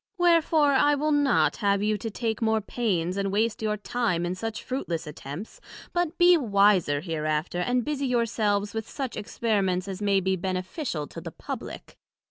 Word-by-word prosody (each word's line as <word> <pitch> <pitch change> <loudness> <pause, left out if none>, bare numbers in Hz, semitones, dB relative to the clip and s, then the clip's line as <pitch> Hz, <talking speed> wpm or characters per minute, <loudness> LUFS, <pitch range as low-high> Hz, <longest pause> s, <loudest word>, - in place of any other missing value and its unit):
Wherefore, 330 -4 +4
I 290 +2 +4
will 305 +2 0
not 290 -3 +3
have 200 -1 +1
you 215 0 +2
to 225 - -4
take 220 0 -3
more 220 -1 +2
pains, 195 -5 -1
and 195 -1 -1
waste 220 +3 0
your 210 -1 0
time 210 -5 -1
in 175 - -1
such 225 +3 -5
fruitless 175 -11 -3
attempts, 150 +6 -8 0.3
but 350 -1 -1
be 355 0 +7
wiser 200 - +3
hereafter, 155 0 -2
and 245 +6 0
busie 280 -2 -1
your 240 -2 +2
selves 205 -2 0
with 220 -1 -4
such 265 -4 -4
Experiments 200 -4 -1
as 195 0 -6
may 200 -1 +3
be 190 0 0
beneficial 185 - -3
to - - -9
the - - -6
publick. - - -8
210 Hz, 175 wpm, -26 LUFS, 185-250 Hz, 0.3 s, be